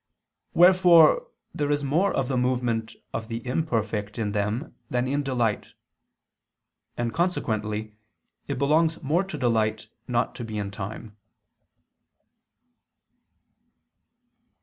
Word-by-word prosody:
Wherefore 180 - +6 0.3
there 145 -1 -1
is 145 0 0
more 165 +9 +2
of 135 - -1
the 130 - -1
movement 125 -3 0 0.2
of 110 - -4
the 115 +1 -5
imperfect 115 -7 -2
in 105 -3 -1
them 105 +7 -2 0.2
than 125 +1 0
in 140 +2 0
delight. 120 -6 -1 1.2
And 120 -1 -2
consequently 110 - -1 0.5
it 140 - -3
belongs 155 +4 +2
more 160 +7 +2
to 190 -5 -6
delight 115 -5 0 0.2
not - - 0
to - - -5
be 110 -2 -5
in 100 -1 -3
time. 105 +2 -7
125 Hz, 110 wpm, -25 LUFS, 110-150 Hz, 1.2 s, Wherefore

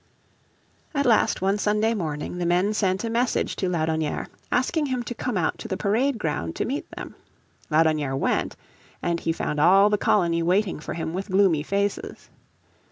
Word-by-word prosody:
At 280 0 +1
last 225 -5 +3
one 195 +2 +1
Sunday 210 +2 +2
morning 160 -3 -4
the 175 - -1
men 180 +4 +2
sent 190 -2 0
a 230 - -2
message 240 +1 0
to 185 - -1
Laudonnière 160 -3 -1 0.2
asking 290 +5 +1
him 255 -2 -2
to 240 - -5
come 240 -2 -3
out 165 - 0
to - - -6
the 190 - -3
parade 230 +7 +1
ground 150 - -3
to - - -1
meet - - -4
them. - - -7 0.6
Laudonnière 155 -3 +2
went, - - 0 0.5
and 170 -1 0
he 165 - -1
found 150 -2 -2
all 195 +6 +6
the 210 - +2
colony 170 -5 +2
waiting 185 +3 +1
for 155 - -6
him 160 -1 -4
with 190 +3 -4
gloomy 190 -5 +3
faces. 200 - -3
190 Hz, 175 wpm, -24 LUFS, 165-215 Hz, 0.6 s, all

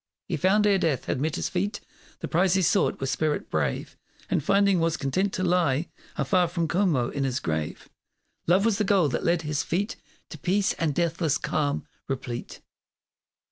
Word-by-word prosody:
He - - -1
found, 210 +3 +3
ere 200 -2 +4
death 155 -7 0
had 130 - -2
met 155 0 0
his - - -1
feet 200 +3 -2 0.4
The - - -3
prize 180 +2 +2
he 190 - +2
sought 195 - +2
with 135 0 -1
spirit 155 -1 -1
brave, - - -1 0.4
And - - +1
finding 200 0 +3
was 165 -1 +1
content 185 +9 0
to 185 - -2
lie 170 -4 +1 0.3
Afar 180 -3 +2
from 170 -1 -1
Como 165 -9 +1
in 140 - -2
his 130 0 -1
grave. 80 -2 -3 0.6
Love 185 +5 +4
was 225 -3 +2
the - - +3
goal 190 -6 +3
that 125 - -2
led 170 -1 +1
his 150 -1 -1
feet 200 +7 -2 0.3
To 155 - -8
peace 200 +8 +1
and 155 -4 0
deathless 165 -3 +1
calm 145 -2 -1 0.2
replete. 125 -3 -5
170 Hz, 180 wpm, -26 LUFS, 145-190 Hz, 0.6 s, ere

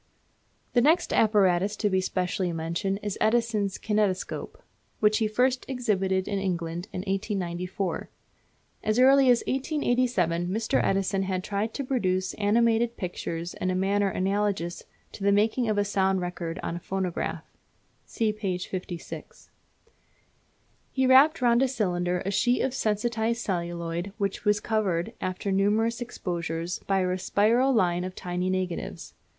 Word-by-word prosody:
The 245 - +4
next 320 +7 +3
apparatus 200 -2 +3
to 210 - 0
be 190 -2 +2
specially 180 -1 -1
mentioned 170 +4 -2
is 205 -2 -3
Edison's 215 -3 +1
Kinetoscope, 210 -4 -1 0.4
which 215 0 +3
he 220 - +2
first 250 +4 +1
exhibited 195 -7 0
in 200 -1 -1
England 175 -1 -3
in 180 - -4
1894. 190 -2 -3 0.7
As 215 +1 +1
early 265 +1 +6
as 245 -1 +4
1887 245 - 0
Mr. 220 +4 0
Edison 195 0 +1
had 185 -1 -2
tried 210 +3 -2
to 280 - -2
produce 185 -8 0
animated 230 +2 +2
pictures 170 -1 -4
in 185 - -2
a 185 - 0
manner 200 +2 +1
analogous 190 -2 -1 0.3
to - - -9
the 200 - +4
making 220 +4 +2
of 215 - 0
a 205 - +2
sound 195 -2 +1
record 175 -2 -4
on 165 - -3
a - - -4
phonograph 185 -1 -3 0.6
(see 220 -2 -1
p. 195 -4 -2
56). 180 -2 -7 1.4
He 265 -1 +1
wrapped 265 +2 +6
round 240 0 +4
a 270 - +4
cylinder 180 -7 -1
a 195 - 0
sheet 245 +5 +2
of 265 - -1
sensitized 230 0 0
celluloid 170 0 -3
which 200 0 -2
was 210 0 +3
covered, 200 -7 -1
after 185 +2 -2
numerous 215 +5 +1
exposures, 170 -6 -3
by 195 -1 +2
a 180 0 0
spiral 230 +8 +3
line 180 -7 +2
of 185 0 -6
tiny 180 +1 -2
negatives. 185 -2 -3
195 Hz, 145 wpm, -27 LUFS, 180-225 Hz, 1.4 s, early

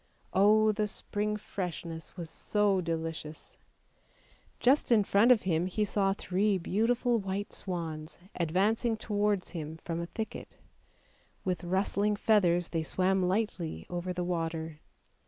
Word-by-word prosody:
Oh! 215 +2 +5
the 210 0 0
spring 210 +1 -2
freshness 170 -5 -6
was 170 -2 -5
so 205 +2 +1
delicious! 160 -2 -5 1.0
Just 260 +1 +3
in 220 -3 +6
front 205 +5 +4
of 240 - +5
him 175 -1 +1
he 210 +3 0
saw 195 -1 +2
three 195 +1 +1
beautiful 230 +6 +1
white 195 +1 -4
swans 160 -4 -4 0.2
advancing 205 +7 +1
towards 205 -3 0
him 160 -2 -6
from 165 -1 -2
a 170 - -4
thicket; 220 +4 -6 0.9
with 180 -2 -1
rustling 200 +3 +1
feathers 180 -5 +3
they 165 - -1
swam 185 +4 +1
lightly 185 -3 -1
over 175 +1 -3
the 180 0 -2
water. 165 -3 -3
190 Hz, 130 wpm, -30 LUFS, 170-210 Hz, 1.0 s, in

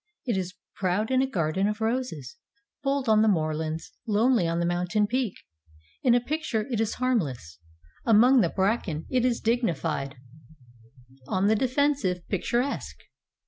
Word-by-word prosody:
It 240 -5 0
is 185 -1 -3 0.2
proud 200 +5 0
in 260 0 +3
a 265 - +1
garden 185 -2 0
of 210 +1 -2
roses, 220 - -2 0.5
bold 275 -2 -1
on 215 -1 +5
the 220 - +4
moorlands, 160 -3 -1 0.2
lonely 220 -2 +3
on 165 0 -1
the 170 - +1
mountain 180 +4 +1
peak. 245 -1 -1 0.7
In 240 -2 +4
a - - +5
picture 260 -5 -2
it 225 -2 0
is 225 -1 -1
harm 255 -1 +2
less, 120 - -6 0.4
among 240 +3 +6
the 170 - +2
bracken 190 -5 -1
it 255 -2 +2
is 245 -2 +1
dignified, 165 - -1 1.1
on 185 +5 0
the 215 +2 +4
defensive, 255 -8 0
picturesque. 240 +7 -1
215 Hz, 150 wpm, -26 LUFS, 175-245 Hz, 1.1 s, among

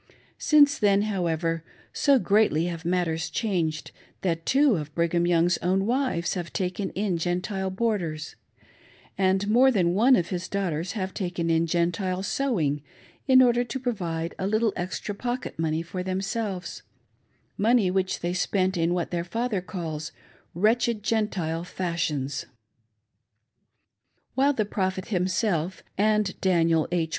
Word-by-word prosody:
Since 290 -2 +5
then, 205 -1 +3
however, 165 -5 -1 0.3
so 280 -2 +4
greatly 205 - +2
have 170 -2 -4
matters 170 -2 0
changed, 170 -9 -2 0.3
that 165 -3 -2
two 275 -3 +4
of 150 -1 -5
Brigham 170 +1 +1
Young's 175 0 +3
own 190 +2 +1
wives 240 -8 0
have 175 -3 -5
taken 185 +1 -2
in 195 -3 -1
Gentile 185 +3 -2
boarders; 185 -7 -2 0.8
and 190 +1 +1
more 245 +5 +5
than 180 -8 +2
one 240 +7 +5
of 175 -6 0
his 180 0 -3
daughters 180 -2 -2
have 190 -3 -3
taken 175 -3 -2
in 165 +1 +2
Gentile 175 +2 0
sewing 190 - 0 0.5
in 260 -1 +7
order 245 -1 +3
to 240 +2 -5
provide 175 -10 -3
a 190 - -1
little 215 +1 +1
extra 185 +3 -4
pocket 245 -2 -4
money 160 0 0
for 180 +2 -5
themselves 190 +1 -3 0.4
— - - -42
money 230 -7 +4
which 190 0 -1
they 175 +1 -1
spent 185 0 0
in 170 +1 +1
what 175 -2 -2
their 170 -1 -1
father 225 +2 -2
calls 160 -4 -5 0.4
"wretched 220 +3 +2
Gentile 190 -8 -1
fashions." 155 -6 -2 1.9
While 275 +3 +3
the 215 -5 0
Prophet 190 -1 -2
himself, 185 -2 0
and 210 -1 +1
Daniel 165 -4 +3
H. 165 -2 0
185 Hz, 140 wpm, -26 LUFS, 170-215 Hz, 1.9 s, in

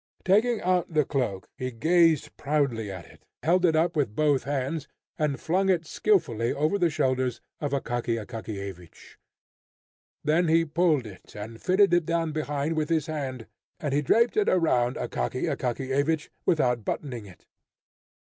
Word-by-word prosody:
Taking 215 +5 +3
out 180 -1 +1
the 155 -2 +2
cloak, 125 -10 -2
he 130 - -3
gazed 160 +5 +2
proudly 140 -8 -1
at 95 -3 -8
it, - - -19 0.2
held 180 +3 +3
it 165 -2 +3
up 170 +2 +2
with 135 -9 0
both 145 -2 +2
hands, 140 +2 -2 0.3
and 150 -3 0
flung 190 +4 +1
it 170 -3 +2
skilfully 155 - +1
over 155 +8 0
the 175 -2 +3
shoulders 130 -4 0 0.2
of 145 - -2
Akaky 120 -4 -1
Akakiyevich. 100 -6 -8 1.1
Then 160 +3 +2
he 165 +1 +4
pulled 155 -4 +2
it 100 -3 -13
and 110 +2 -8
fitted 190 0 +4
it 175 -2 +3
down 165 -1 0
behind 150 0 -2
with 155 -1 -1
his 160 -3 +1
hand, 135 -6 -4 0.3
and 145 -3 -2
he 145 - +2
draped 230 - +3
it 425 - +3
around 130 -9 +2
Akaky - - -3
Akakiyevich 135 +5 -1 0.2
without 125 -9 +2
buttoning 120 -3 -4
it. 90 - -16
150 Hz, 155 wpm, -27 LUFS, 125-165 Hz, 1.1 s, he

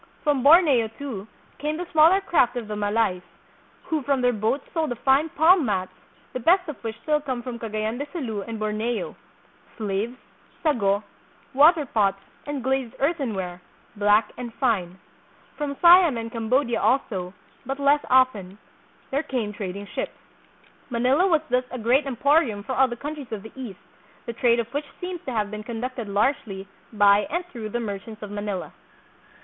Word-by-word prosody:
From 290 -4 +2
Borneo, 285 -5 +6
too, 230 -8 -6 0.3
came 300 +2 -2
the 355 - -4
smaller 325 +5 +6
craft 320 -11 +2
of 235 -3 -4
the 210 - -4
Malays, 205 -2 0 0.6
who 315 -3 -1
from 275 0 0
their 245 0 +3
boats 220 +6 -1
sold 320 -2 0
the 245 - -2
fine 270 +6 +2
palm 330 +3 +5
mats, 190 -6 -1 0.4
the 255 - -3
best 360 +8 +3
of 300 -5 -8
which 225 0 -5
still 300 -1 +1
come 260 -4 -4
from 240 -2 -6
Cagayan 220 +1 -3
de 285 - -4
Sulu 235 - -4
and 225 +2 -6
Borneo, 215 +2 -2 0.6
slaves, 215 +3 -2 0.5
sago, 205 -10 +2 0.5
water 300 +3 +6
pots 200 -6 +1 0.3
and 290 -3 -4
glazed 265 -2 -1
earthenware, 220 - -2 0.3
black 205 +1 +3
and 240 -1 -6
fine. 195 -9 0 0.6
From 285 -2 -4
Siam 345 -6 +7
and 230 0 -5
Cambodia 235 +1 0
also, 195 -8 0 0.3
but 270 +2 -4
less 285 +1 +3
often, 220 -8 +2 0.5
there 280 +2 +1
came 240 -8 -3
trading 200 0 -5
ships. - - -5 0.7
Manila 255 +9 +2
was 325 -5 +3
thus 250 0 +2
a 255 - -6
great 250 +5 +2
em 265 - -3
porium 255 -6 +2
for 260 - -3
all 265 +1 +4
the 240 - -5
countries 285 0 -7
of 210 -3 -5
the 220 - -10
East, 240 -8 -7 0.5
the 235 - -4
trade 235 0 +2
of 235 - 0
which 290 +1 -2
seems 360 -1 -5
to - - -2
have 215 -3 -1
been 215 0 -5
conducted 235 0 -5
largely 200 -2 -1 0.2
by 205 -1 +4
and 345 +2 -2
through 220 -3 -6
the 240 - -2
merchants 215 0 -6
of 205 - -7
Manila. 205 -2 -4
240 Hz, 170 wpm, -24 LUFS, 215-285 Hz, 0.7 s, Siam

